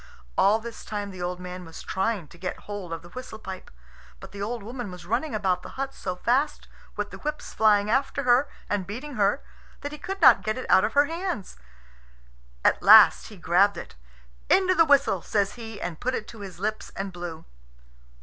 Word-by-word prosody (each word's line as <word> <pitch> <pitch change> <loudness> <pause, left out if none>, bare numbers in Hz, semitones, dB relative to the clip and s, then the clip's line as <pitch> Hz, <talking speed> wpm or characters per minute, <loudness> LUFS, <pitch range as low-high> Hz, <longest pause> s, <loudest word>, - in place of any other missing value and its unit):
All 205 +3 +4
this 230 +1 -9
time 205 -1 -4
the 185 -1 -9
old 180 0 -3
man 180 0 -7
was 165 -1 -10
trying 190 -3 -1
to 170 - -16
get 185 - -5
hold 205 -4 -7
of 165 0 -5
the 175 - -13
whistle 255 +2 -8
pipe. 190 -3 -8 0.5
But - - -11
the 200 - -8
old 225 +1 -3
woman 240 0 -6
was 180 -1 -10
running 235 - -1
about 190 -3 0
the - - -11
hut 270 0 -3
so 185 -1 -4
fast, 255 +10 0 0.3
with - - -3
the - - -9
whips 300 0 -5
flying 210 -2 +4
after 270 +4 0
her 250 +3 +4 0.2
and 200 -3 -2
beating 255 +9 -6
her, 205 +6 +2 0.4
that 290 - -5
he 300 - -8
could 390 +1 -5
not 305 - +7
get 215 +2 -2
it 255 - -5
out 190 - +6
of 215 - 0
her 285 +1 +5
hands. 330 - -4 1.1
At - - +4
last - - +8
he 210 - -12
grabbed 185 +4 +3
it. - - -8 0.6
"Into 375 -1 +4
the 330 -2 +5
whistle," 280 - +3
says 200 0 0
he, 225 -3 -8
and 175 -5 -5
put 255 +1 -1
it 215 - -5
to 225 - -11
his 195 -3 -8
lips 215 +3 -3
and 195 -1 -4
blew. 175 -2 -7
210 Hz, 205 wpm, -26 LUFS, 185-255 Hz, 1.1 s, last